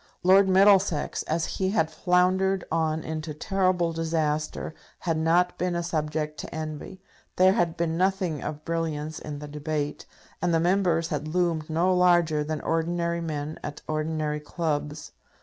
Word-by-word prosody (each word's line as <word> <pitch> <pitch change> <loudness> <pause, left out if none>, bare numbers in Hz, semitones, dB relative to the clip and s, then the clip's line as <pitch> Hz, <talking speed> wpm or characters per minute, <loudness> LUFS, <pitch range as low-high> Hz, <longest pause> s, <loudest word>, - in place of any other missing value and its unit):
Lord 190 +2 +6
Middlesex, 190 -4 +4
as 160 0 0
he 190 -1 -1
had 190 -6 +1
floundered 185 +2 +2
on 160 -1 0
into 155 -1 -5
terrible 185 -1 +1
disaster, 155 -2 -1 0.3
had 165 -2 0
not 170 +3 +2
been 180 0 0
a 170 - -1
subject 155 -2 -2
to - - -6
envy. 155 +4 -6 0.4
There 185 +1 +5
had 170 -4 0
been 165 -1 0
nothing 185 -4 0
of 150 0 -6
brilliance 160 -2 -2
in 150 -1 -6
the 150 +1 -7
debate, 150 0 -3 0.3
and 175 -1 +2
the - - +3
Members 175 -2 +2
had 150 0 -3
loomed 165 -2 0
no 170 +4 +2
larger 175 -4 +3
than 155 0 -3
ordinary 170 +1 -1
men 155 -2 -4
at 145 - -6
ordinary 155 -1 -1
clubs. 150 -1 -3
165 Hz, 150 wpm, -26 LUFS, 155-180 Hz, 0.4 s, Lord